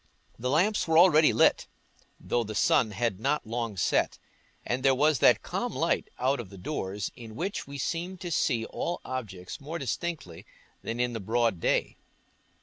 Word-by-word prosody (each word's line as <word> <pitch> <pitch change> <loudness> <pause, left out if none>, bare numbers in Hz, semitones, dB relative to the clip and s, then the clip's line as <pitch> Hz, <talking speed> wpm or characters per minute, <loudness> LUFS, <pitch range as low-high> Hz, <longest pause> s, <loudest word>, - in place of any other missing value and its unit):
The 125 +2 -2
lamps 185 +10 +2
were 160 0 +3
already 160 -3 +7
lit, - - +3 0.5
though 120 - -1
the 110 -1 -6
sun 110 +2 +3
had 105 -1 -2
not 140 +6 0
long 115 -2 -3
set, - - +1 0.5
and 125 +2 -1
there 135 0 +4
was 150 0 +3
that - - +5
calm - - -3
light - - 0
out 130 +2 +1
of 100 -5 -9
doors 100 -8 -3
in 115 -2 -10
which 185 - -3
we 140 0 -7
seem 175 +6 -3
to 175 -1 -6
see 115 -7 +1
all 175 - -3
objects 105 -6 -6
more 155 +4 -5
distinctly 140 - -4 0.4
than 115 +1 -4
in 125 0 0
the 115 - -3
broad 110 -1 0
day. - - 0
125 Hz, 170 wpm, -28 LUFS, 110-155 Hz, 0.5 s, already